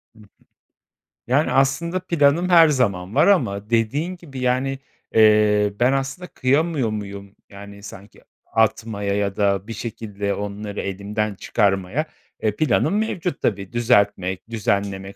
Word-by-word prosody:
Hı -, -, -19 dB
hı. 105 Hz, -, -17 dB, 1.0 s
Yani, 140 Hz, +5 st, +2 dB
aslında 155 Hz, +7 st, +1 dB
planım 170 Hz, 0 st, +2 dB
her 165 Hz, -2 st, +7 dB
zaman 100 Hz, -9 st, 0 dB
var -, -, +5 dB
ama 105 Hz, -, +1 dB
dediğin 135 Hz, +11 st, 0 dB
gibi, 140 Hz, -7 st, -10 dB
yani, 130 Hz, +2 st, 0 dB, 0.4 s
eee, 105 Hz, -2 st, +4 dB
ben 125 Hz, +2 st, +4 dB
aslında 135 Hz, +7 st, -3 dB
kıyamıyor 140 Hz, -1 st, 0 dB
muyum? 100 Hz, -1 st, -7 dB
Yani, 100 Hz, 0 st, -12 dB
sanki 100 Hz, 0 st, -12 dB, 0.2 s
atmaya 110 Hz, -2 st, 0 dB
ya 100 Hz, -1 st, -1 dB
da 100 Hz, 0 st, 0 dB
bir 115 Hz, -, -5 dB
şekilde 105 Hz, -2 st, -4 dB
onları 105 Hz, 0 st, -5 dB
elimden 100 Hz, +2 st, -3 dB
çıkarmaya. 100 Hz, +8 st, 0 dB, 0.3 s
E, 105 Hz, -1 st, -1 dB
planım 155 Hz, -, +1 dB
mevcut 185 Hz, -7 st, -2 dB
tabii. 100 Hz, 0 st, -2 dB
Düzeltmek, 100 Hz, -5 st, +1 dB
düzenlemek 100 Hz, -3 st, -2 dB
110 Hz, 130 wpm, -22 LUFS, 100-135 Hz, 1.0 s, her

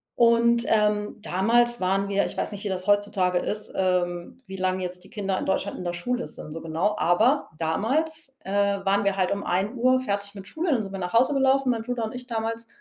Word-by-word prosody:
und, 235 Hz, 0 st, +4 dB
ähm, 210 Hz, -1 st, +1 dB
damals 235 Hz, +5 st, +2 dB
waren 195 Hz, +2 st, 0 dB
wir 200 Hz, 0 st, +2 dB
ich -, -, -3 dB
weiß -, -, -2 dB
nicht, 205 Hz, 0 st, -7 dB
wie -, -, 0 dB
das 185 Hz, -1 st, -3 dB
heutzutage 205 Hz, -3 st, +2 dB
ist, 210 Hz, +3 st, -3 dB
ähm, 175 Hz, -2 st, -1 dB
wie 190 Hz, 0 st, -7 dB
lange 185 Hz, 0 st, 0 dB
jetzt 180 Hz, 0 st, -6 dB
die -, -, -16 dB
Kinder 195 Hz, -3 st, -2 dB
in -, -, -4 dB
Deutschland 190 Hz, -, -1 dB
in 180 Hz, -, -7 dB
der 175 Hz, -, -2 dB
Schule 245 Hz, +8 st, -2 dB
sind, 155 Hz, -, -8 dB
so 165 Hz, -, -5 dB
genau. 165 Hz, +6 st, -1 dB
Aber 225 Hz, -, +3 dB
damals, 270 Hz, -, -1 dB
äh, 190 Hz, -, -6 dB
waren 200 Hz, 0 st, +1 dB
wir 200 Hz, -1 st, +2 dB
halt 185 Hz, -2 st, +1 dB
um 200 Hz, 0 st, -2 dB
13:00 235 Hz, +7 st, +1 dB
fertig 200 Hz, -3 st, -3 dB
mit 195 Hz, -1 st, -9 dB
Schule, 320 Hz, -, -2 dB
dann 230 Hz, -4 st, 0 dB
sind 195 Hz, -, -7 dB
wir 195 Hz, -, -5 dB
nach 180 Hz, -1 st, -4 dB
Hause 250 Hz, +5 st, +4 dB
gelaufen, 270 Hz, -1 st, +3 dB
mein 230 Hz, -2 st, 0 dB
Bruder 245 Hz, 0 st, -3 dB
und 220 Hz, -, -4 dB
ich 250 Hz, 0 st, -7 dB
damals 230 Hz, -1 st, -3 dB
205 Hz, 225 wpm, -25 LUFS, 185-235 Hz, -, und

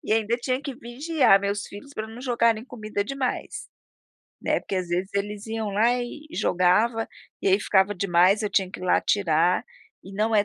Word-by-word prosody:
E -, -, 0 dB
ainda 225 Hz, +1 st, +2 dB
tinha 255 Hz, +1 st, -2 dB
que 280 Hz, -2 st, -6 dB
vigiar 250 Hz, -2 st, +2 dB
meus 200 Hz, +1 st, -2 dB
filhos 245 Hz, +8 st, -11 dB
pra 215 Hz, 0 st, -4 dB
não 225 Hz, +2 st, -10 dB
jogarem 235 Hz, -3 st, +1 dB
comida 215 Hz, -5 st, -4 dB
demais, 270 Hz, +2 st, -4 dB, 0.7 s
né, -, -, +1 dB
porque 195 Hz, -, -4 dB
às 185 Hz, -1 st, -2 dB
vezes 180 Hz, +3 st, -1 dB
eles 205 Hz, +1 st, -3 dB
iam 220 Hz, -1 st, -3 dB
lá 225 Hz, +5 st, +3 dB
e 295 Hz, +5 st, -8 dB
e -, -, -8 dB
jogava, 215 Hz, +6 st, +2 dB, 0.3 s
e -, -, +2 dB
aí 195 Hz, +2 st, +4 dB
ficava 200 Hz, 0 st, +2 dB
demais, 185 Hz, +2 st, +3 dB
eu 210 Hz, -, -1 dB
tinha 190 Hz, -2 st, +1 dB
que -, -, -9 dB
ir -, -, -6 dB
lá 180 Hz, -, +3 dB
tirar, 175 Hz, -3 st, +2 dB, 0.4 s
e 195 Hz, -, -10 dB
não 220 Hz, +2 st, +1 dB
é 205 Hz, -1 st, +4 dB
210 Hz, 200 wpm, -25 LUFS, 195-235 Hz, 0.7 s, aí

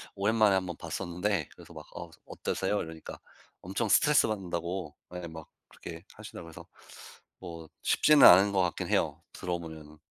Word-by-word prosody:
오랜만에 105 Hz, 0 st, +3 dB
1 95 Hz, -1 st, 0 dB
번 85 Hz, -2 st, -6 dB
봤었는데 90 Hz, +4 st, -2 dB
그래서 -, -, -14 dB
막 -, -, -10 dB
"어 85 Hz, -1 st, -7 dB, 0.2 s
어떠세요?" 100 Hz, +2 st, -2 dB
이러니까 80 Hz, -1 st, -9 dB, 0.4 s
엄청 100 Hz, +4 st, -2 dB
스트레스 150 Hz, +5 st, +5 dB
받는다고 90 Hz, -5 st, -4 dB, 0.2 s
예 90 Hz, -1 st, -5 dB
막 80 Hz, -1 st, -10 dB, 0.2 s
그렇게 85 Hz, +2 st, -10 dB
하시더라 105 Hz, -4 st, -10 dB
그래서 80 Hz, -1 st, -11 dB, 0.7 s
뭐 85 Hz, -3 st, -9 dB
쉽지는 150 Hz, -1 st, +6 dB
않은 95 Hz, +3 st, +7 dB
것 95 Hz, -1 st, +2 dB
같긴 90 Hz, -2 st, -1 dB
해요 -, -, 0 dB
들어 90 Hz, -1 st, -3 dB
보면은. 80 Hz, -2 st, -10 dB
90 Hz, 355 characters per minute, -29 LUFS, 85-100 Hz, 0.7 s, 않은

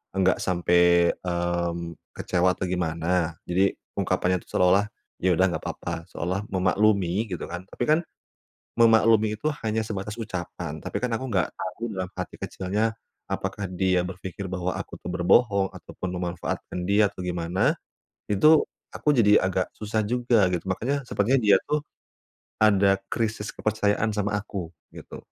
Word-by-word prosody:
enggak 95 Hz, -1 st, +3 dB
sampai, 85 Hz, -1 st, +4 dB, 0.2 s
mmm, 85 Hz, -1 st, -2 dB, 0.2 s
kecewa 90 Hz, 0 st, +1 dB
atau -, -, -5 dB
gimana. 85 Hz, -1 st, 0 dB, 0.2 s
Jadi, 95 Hz, +3 st, +3 dB, 0.3 s
ungkapannya 90 Hz, 0 st, +1 dB
itu, -, -, -21 dB
seolah-olah, 95 Hz, +3 st, +4 dB, 0.3 s
"Ya 90 Hz, 0 st, +3 dB
udah, 95 Hz, +3 st, +4 dB
nggak -, -, -4 dB
apa-apa." 85 Hz, -, -5 dB
Seolah 95 Hz, +4 st, -3 dB
memaklumi, 95 Hz, +1 st, +2 dB
gitu 90 Hz, -4 st, -5 dB
kan. 90 Hz, +1 st, -6 dB
Tapi 120 Hz, -, -4 dB
kan, 155 Hz, +1 st, +5 dB, 0.8 s
memaklumi 110 Hz, -1 st, +5 dB
itu 150 Hz, +8 st, -1 dB, 0.2 s
hanya 110 Hz, +1 st, +1 dB
sebatas 105 Hz, -1 st, -4 dB
ucapan. 90 Hz, -7 st, -5 dB
Tapi -, -, -5 dB
kan 125 Hz, -, 0 dB
aku 120 Hz, +4 st, -2 dB
nggak 95 Hz, -7 st, +1 dB
tahu, -, -, -7 dB, 0.2 s
dalam 95 Hz, -1 st, -2 dB
hati -, -, -5 dB
kecilnya, 105 Hz, +4 st, -1 dB, 0.3 s
apakah 100 Hz, -, -3 dB
dia 95 Hz, 0 st, +1 dB
berpikir 95 Hz, +1 st, -6 dB
bahwa 90 Hz, 0 st, -2 dB
aku -, -, -6 dB
tuh -, -, -5 dB
berbohong 100 Hz, +2 st, +3 dB
ataupun 90 Hz, +1 st, -7 dB
memanfaatkan 90 Hz, 0 st, -4 dB
dia, 100 Hz, 0 st, +4 dB
atau -, -, -10 dB
gimana. 90 Hz, +1 st, +1 dB, 0.6 s
Itu, 155 Hz, +10 st, +6 dB, 0.3 s
aku -, -, -1 dB
jadi 105 Hz, -3 st, +6 dB
agak 95 Hz, -1 st, -1 dB
susah 110 Hz, 0 st, -1 dB
juga, 120 Hz, -3 st, +3 dB
gitu. 85 Hz, -, -1 dB
Makanya, 135 Hz, +9 st, -1 dB
sepertinya 125 Hz, +2 st, +1 dB
dia 100 Hz, -3 st, +6 dB
tuh, 150 Hz, 0 st, +1 dB, 0.8 s
ada 100 Hz, -2 st, +5 dB, 0.2 s
krisis 110 Hz, -2 st, -2 dB
kepercayaan 110 Hz, 0 st, 0 dB
sama 105 Hz, 0 st, 0 dB
aku, 95 Hz, -5 st, -6 dB, 0.2 s
gitu. -, -, -10 dB
95 Hz, 145 wpm, -25 LUFS, 90-110 Hz, 0.8 s, Itu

